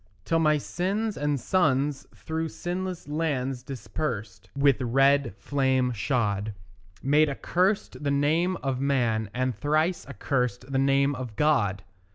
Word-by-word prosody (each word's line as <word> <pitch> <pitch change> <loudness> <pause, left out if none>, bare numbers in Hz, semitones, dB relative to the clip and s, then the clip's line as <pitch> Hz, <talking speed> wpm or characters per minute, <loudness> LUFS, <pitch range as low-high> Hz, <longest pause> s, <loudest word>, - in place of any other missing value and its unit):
Till 165 - +2
my 155 -1 +4
sins 200 +8 -2
and 145 -1 0
sons 145 -3 +1
through 160 +9 -3
sinless 180 0 -4
lands 135 -5 -2
dispersèd, 110 -6 -5
With 140 -2 +3
red 135 -1 +3
flame 130 +1 +1
shod, 105 -3 -1 0.5
Made 150 +3 +4
accurst 180 +5 0
the 145 - 0
name 155 +6 +2
of 135 -2 -1
man, 120 -6 +1
and 130 0 -1
thrice 155 - 0
accursèd 125 -1 -2
The 135 - +1
name 140 +1 +3
of 125 -5 -6
God. 105 -10 +2
140 Hz, 130 wpm, -27 LUFS, 125-155 Hz, 0.5 s, my